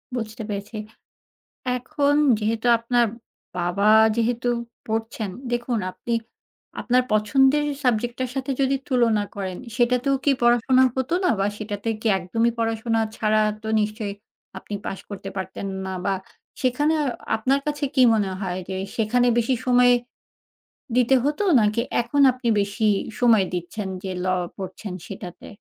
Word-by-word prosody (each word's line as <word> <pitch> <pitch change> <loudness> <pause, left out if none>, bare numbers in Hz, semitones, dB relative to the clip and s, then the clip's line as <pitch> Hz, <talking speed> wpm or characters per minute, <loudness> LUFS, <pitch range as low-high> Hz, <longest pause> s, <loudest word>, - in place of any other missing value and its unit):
বুঝতে 225 -1 -5
পেরেছি। 205 +2 -5 1.0
এখন 285 +2 0 0.2
যেহেতু 225 +2 -1
আপনার 235 0 +2 0.5
বাবা 180 +4 +1 0.3
যেহেতু 235 +1 0 0.4
পড়ছেন, 220 -2 -2 0.2
দেখুন 240 -1 -1
আপনি 235 - -3 0.7
আপনার 250 +1 +2
পছন্দের 265 +7 +3 0.2
সাবজেক্টটার 245 +1 0
সাথে 270 +1 -3
যদি 275 0 +2
তুলনা 230 -5 +2
করেন, 190 -2 -4 0.2
সেটাতেও 250 +2 +2
কি 285 - +4
পড়াশোনা 245 +2 +4
হতো 260 +6 0
না? - - +4
বা 195 - +2
সেটাতে 210 0 -5
কি 225 - -5
একদমই 225 +6 0
পড়াশোনা 225 0 0 0.2
ছাড়া 215 0 +2 0.2
তো 220 - -5
নিশ্চই 210 -1 -2 0.5
আপনি 205 - -8
পাশ 195 - -4
করতে 195 -1 -7
পারতেন 190 +1 -5 0.2
না? 190 - -4
বা 195 - +2 0.5
সেখানে 280 +5 +2
আ - - -1 0.3
আপনার 265 +5 +1
কাছে 295 -1 -1
কি 260 - +5
মনে 205 -3 0
হয়? 185 -2 -3
যে 190 - -3 0.2
সেখানে 240 +2 +2
বেশি 240 +2 +2
সময় 245 0 +5 1.1
দিতে 250 +2 +4
হতো, 295 +8 0 0.2
নাকি 215 +2 +2 0.2
এখন 240 +5 0
আপনি 250 -1 -5
বেশি 210 +2 -1 0.3
সময় 225 -5 +5
দিচ্ছেন, 185 +4 -4 0.2
যে 190 - -3
law 185 -1 +1 0.2
পড়ছেন, 190 0 -6
সেটাতে? 185 -3 -9
230 Hz, 140 wpm, -23 LUFS, 210-250 Hz, 1.1 s, কি